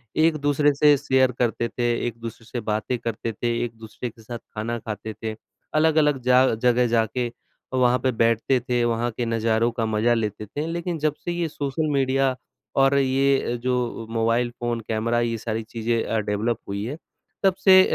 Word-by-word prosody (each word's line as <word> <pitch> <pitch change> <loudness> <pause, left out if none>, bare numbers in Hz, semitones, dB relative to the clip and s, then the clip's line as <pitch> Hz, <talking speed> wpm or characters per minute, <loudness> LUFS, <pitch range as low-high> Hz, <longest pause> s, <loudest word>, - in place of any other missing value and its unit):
एक 160 0 +3
दूसरे 145 0 +2
से 145 +1 +6
शेयर 130 -2 +3
करते 120 -1 +1
थे, 120 +2 -4 0.2
एक 115 -1 -5
दूसरे 115 0 -8
से 120 - -4
बातें 110 +3 -1
करते 115 0 -3
थे, 120 +3 -1
एक-दूसरे 115 +1 -7
के 115 0 -18
साथ 120 +2 -6 0.2
खाना 115 +2 -2
खाते 110 0 -6
थे। 110 -1 -2 0.4
अलग-अलग 155 -2 +3
जा 125 +1 +5
जगह 125 +1 +3
जाके 115 +1 +1
अ, 120 +2 -13
वहाँ 125 0 +4
पे 130 +2 +1
बैठते 115 +2 +2
थे, 120 0 0
वहाँ 120 0 0
के 120 +2 -3
नज़ारों 115 0 +1
का 115 -1 -2
मज़ा 110 +2 +2
लेते 105 -2 -2
थे। 145 +9 -4
लेकिन 170 +1 -3
जब 150 0 +1
से 175 - -1
ये 170 -1 -1
सोशल 150 +1 -2
मीडिया 135 -1 +2 0.4
और 135 +1 +4
ये 135 0 +3
अ, - - -1
जो 120 -1 -2
मोबाइल 115 +1 +1
फ़ोन, 120 -1 -1
कैमरा, 115 +2 0
ये 115 -1 0
सारी 110 0 -3
चीज़ें 115 +1 -1
अ, 115 - -1
डेवलप 105 +2 -1
हुई 100 +1 -3
हैं, 140 +6 -5 0.5
तब 190 -2 +4
से 190 -1 +9
120 Hz, 185 wpm, -24 LUFS, 115-135 Hz, 0.5 s, से